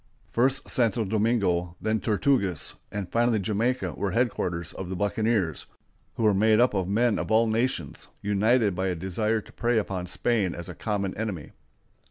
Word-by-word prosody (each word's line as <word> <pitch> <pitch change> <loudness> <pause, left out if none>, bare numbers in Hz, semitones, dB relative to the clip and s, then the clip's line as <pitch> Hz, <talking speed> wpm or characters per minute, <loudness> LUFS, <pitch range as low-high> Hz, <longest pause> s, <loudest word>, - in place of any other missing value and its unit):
First 130 +3 +1
Santo 115 -2 +1
Domingo, 100 -5 +1
then 110 +1 0
Tortugas, 105 - +1 0.2
and 100 -3 -4
finally 120 -1 +2
Jamaica 115 +6 -1
were 100 - -2
headquarters 90 -8 -1
of 95 -2 -6
the 95 - -3
buccaneers, 105 -3 0 0.5
who 115 - -2
were 105 -1 +5
made 110 +2 +4
up 125 -1 +4
of 95 -3 0
men 115 +3 +2
of - - -4
all 110 +1 +4
nations, 115 +3 -1
united 105 +1 +2
by 95 +2 -1
a 90 - -1
desire 105 +5 -1
to - - -17
prey 120 -1 +1
upon 95 -4 -2
Spain 100 -1 0
as 85 -1 -7
a - - -6
common 100 -3 -2
enemy. 100 -8 -4
105 Hz, 170 wpm, -26 LUFS, 95-115 Hz, 0.5 s, were